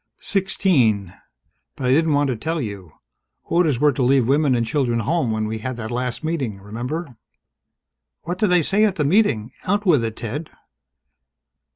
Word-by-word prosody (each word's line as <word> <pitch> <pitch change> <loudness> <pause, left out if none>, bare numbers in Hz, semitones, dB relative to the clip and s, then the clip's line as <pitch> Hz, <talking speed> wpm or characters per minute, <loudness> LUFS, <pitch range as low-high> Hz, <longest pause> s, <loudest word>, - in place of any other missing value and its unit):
"Sixteen. 130 - +1 0.6
But 130 - -5
I 125 - +3
didn't 160 +3 +3
want 145 -1 +2
to 125 - 0
tell 160 +8 -3
you. 100 - -6 0.5
Orders 160 -7 +1
were 150 +1 +4
to 135 - -3
leave 130 -1 +3
women 140 -1 +3
and 120 -1 0
children 120 -1 0
home 150 +2 0
when 110 -1 -1
we 110 +1 -4
had 130 +2 -5
that 110 -1 -5
last 125 +3 -3
Meeting, 135 -11 -2
remember." 125 - -5 1.1
"What 175 +2 -4
did 215 - +3
they 180 -2 +4
say 200 +7 +2
at 205 -4 +2
the 150 -5 0
Meeting? 140 - +2 0.2
Out 205 +2 +1
with 150 -10 +4
it, 110 -1 -3
Ted!" 145 +8 -5
135 Hz, 175 wpm, -21 LUFS, 115-165 Hz, 1.1 s, were